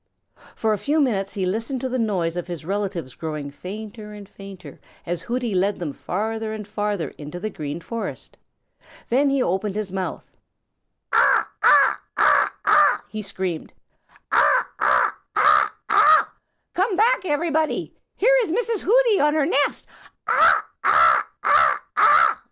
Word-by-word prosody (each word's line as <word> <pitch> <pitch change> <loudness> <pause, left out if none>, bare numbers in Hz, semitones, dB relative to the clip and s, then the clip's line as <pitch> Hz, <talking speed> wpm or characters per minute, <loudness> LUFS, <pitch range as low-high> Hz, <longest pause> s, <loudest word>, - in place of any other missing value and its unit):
For 220 -1 0
a 210 - -3
few 300 +8 0
minutes 200 -9 -1
he 190 -2 -3
listened 230 +8 -3
to 260 - -2
the 255 0 -3
noise 185 -7 -1
of 175 0 -5
his 170 -3 -7
relatives 190 -8 -4
growing 150 -3 -6
fainter 210 +5 -9
and 205 -1 -11
fainter, 195 -2 -13 0.3
as 175 -1 -4
Hooty 240 +1 -3
led 195 +2 0
them 160 -5 -5
farther 220 +6 -4
and 210 -2 -8
farther 205 -6 -3
into 150 +4 -8
the 215 +3 -5
Green 150 -2 -6
Forest. 230 +6 -7 0.7
Then 275 +4 +2
he 275 -2 +1
opened 190 +3 -2
his 210 -3 -4
mouth. 190 -1 -5 0.9
"Caw, - - +3 0.2
caw, - - +5 0.2
caw, - - +3
caw!" - - +4
he 215 - -6
screamed. 190 -4 -5 0.6
"Caw, - - +4 0.2
caw, - - +2 0.2
caw, - - +4 0.2
caw! 420 0 +5 0.5
Come 380 +2 0
back, 450 +4 +2
everybody! 315 0 -1 0.2
Here - - +3
is 440 - -3
Mrs. 455 +1 -1
Hooty 465 -1 +3
on 295 +1 +2
her 305 -3 +1
nest! 285 +1 0
210 Hz, 140 wpm, -22 LUFS, 185-285 Hz, 0.9 s, caw